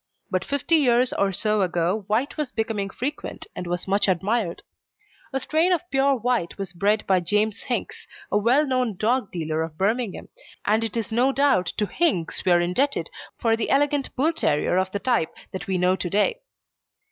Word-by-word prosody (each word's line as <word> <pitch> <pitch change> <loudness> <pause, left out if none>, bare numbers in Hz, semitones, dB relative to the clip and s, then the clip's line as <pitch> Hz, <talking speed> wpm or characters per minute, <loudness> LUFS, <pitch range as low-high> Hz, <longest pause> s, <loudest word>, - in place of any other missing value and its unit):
But 185 0 0
fifty 285 +6 +1
years 250 -3 +3
or 200 -1 +1
so 210 +2 +1
ago 180 +3 0
white 230 +7 0
was 300 -5 -3
becoming 220 -3 -2
frequent, 275 +9 -5
and 180 - -5
was 175 +1 -3
much 200 +2 +2
admired. 190 +1 0 0.7
A 270 - -1
strain 320 +6 +2
of 355 0 0
pure 275 0 +3
white 240 -7 -1
was 195 -2 -5
bred 205 +4 +1
by 190 -1 +3
James 210 +5 0
Hinks, - - -4 0.2
a - - +3
well 250 +8 +3
known 255 -5 0
dog 230 +1 0
dealer 160 -2 -2
of 160 -1 -5
Birmingham, 215 +3 -1 0.4
and 215 +2 +2
it 225 0 -3
is 225 0 -3
no 245 +4 +3
doubt 270 -10 +2
to 210 - +1
Hinks 200 - 0
that - - -2
we - - +5
are 175 - +6
indebted 250 +12 0 0.3
for 225 -2 +2
the 225 - -2
elegant 285 0 +1
Bull 310 +6 +2
terrier 155 - +1
of 185 0 0
the 200 - -1
type 230 -7 0 0.2
that 190 - -6
we 190 -1 0
know 180 +1 +3
to 180 - -3
day. 210 - +1
215 Hz, 195 wpm, -24 LUFS, 185-260 Hz, 0.7 s, are